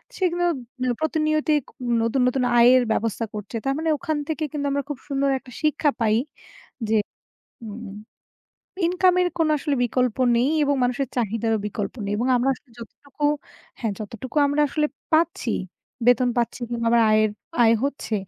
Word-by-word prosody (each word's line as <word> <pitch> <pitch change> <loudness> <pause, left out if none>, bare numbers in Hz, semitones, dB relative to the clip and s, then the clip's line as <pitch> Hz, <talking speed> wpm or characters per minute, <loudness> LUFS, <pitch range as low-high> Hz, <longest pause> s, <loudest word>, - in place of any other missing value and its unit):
সে 375 - -4
কিন্তু 350 0 0 0.5
প্রতিনিয়ত 310 0 0 0.5
নতুন, 230 +3 +1
নতুন 255 0 +1 0.2
আয়ের 250 +2 +7
ব্যবস্থা 230 +1 -1
করছে। 210 +2 -7
তার 270 - +1
মানে 320 0 -1
ওখান 310 +1 -2
থেকে 315 0 -2
কিন্তু 285 -1 -3
আমরা 280 0 0
খুব 290 - -3
সুন্দর 275 -1 0
একটা 255 -1 -15
শিক্ষা 305 -1 +2
পাই 220 -1 +2 0.7
যে 220 - +3 0.7
হুম 215 -1 -8 0.9
ইনকাম 365 +1 +3
এর 355 - +2
কোনো 315 -1 +2
আসলে 285 0 -1
বিকল্প 250 -1 0 0.2
নেই 255 +5 +2
এবং 285 0 +2
মানুষের 245 +1 0
চাহিদারও 225 -1 0
বিকল্প 205 +1 -4
নেই 200 - -2
এবং 245 - 0
আমরা 250 +3 +1
আসলে 250 - -22
যতটুকু 280 +5 -8 0.5
হ্যাঁ, 225 -4 -2
যতটুকু 225 +6 -8
আমরা 285 +1 0
আসলে 300 +1 +1 0.3
পাচ্ছি, 320 -6 +2 0.6
বেতন 245 0 +5
পাচ্ছি 235 +1 0
কিংবা 235 -1 -2
আমার 235 -1 +5
আয়ের 215 0 +4 0.3
আয় 230 0 +6
হচ্ছে 280 -5 -3
255 Hz, 160 wpm, -23 LUFS, 230-300 Hz, 0.9 s, আয়ের